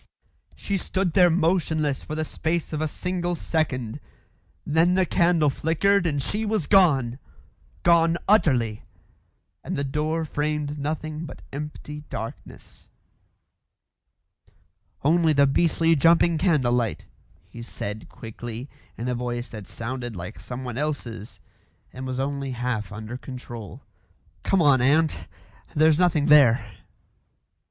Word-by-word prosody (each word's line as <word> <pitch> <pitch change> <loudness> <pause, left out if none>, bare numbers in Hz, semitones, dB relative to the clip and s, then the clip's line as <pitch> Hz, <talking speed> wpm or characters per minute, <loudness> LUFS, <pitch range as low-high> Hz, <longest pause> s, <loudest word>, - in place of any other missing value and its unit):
She 200 - -2
stood 185 -1 -1
there 180 -2 +6
motionless 160 -4 +1
for 155 - -6
the 155 0 -1
space 160 +1 -2
of 155 - -2
a 155 - +1
single 175 +2 -2
second. 135 -7 -2 0.7
Then 165 +4 +3
the 190 -1 +3
candle 170 -4 +3
flickered 175 +6 +2
and 145 -4 -1
she 210 +9 -2
was 215 -6 0
gone 140 - +3 0.6
gone 170 -1 +4
utterly 130 - +3 0.8
and - - -4
the 140 - -1
door 155 +4 -1
framed 150 0 -2
nothing 155 +2 -3
but - - -11
empty 150 +1 -7
darkness. 110 - -9 2.2
"Only 160 +2 +4
the 140 -1 +5
beastly 165 +3 +3
jumping 165 +2 +4
candle 145 -10 +2
light," 120 -4 -1 0.4
he 120 - -10
said 110 -2 -6
quickly, 120 +1 -8 0.3
in 120 - -4
a 125 - 0
voice 120 0 -3
that 105 -4 -9
sounded 120 0 -5
like 85 -2 -7
someone 125 +4 -6
else's 120 -9 -4 0.5
and 130 +1 -6
was 130 0 -3
only 140 -1 -2
half 120 -4 -3
under 110 +3 -6
control. 120 -5 -9 0.6
"Come 190 -3 +2
on, 140 -4 +5
aunt. 155 +5 +2 0.5
There's 155 +1 +4
nothing 170 -5 +3
there." 120 -8 +5
150 Hz, 125 wpm, -25 LUFS, 125-165 Hz, 2.2 s, there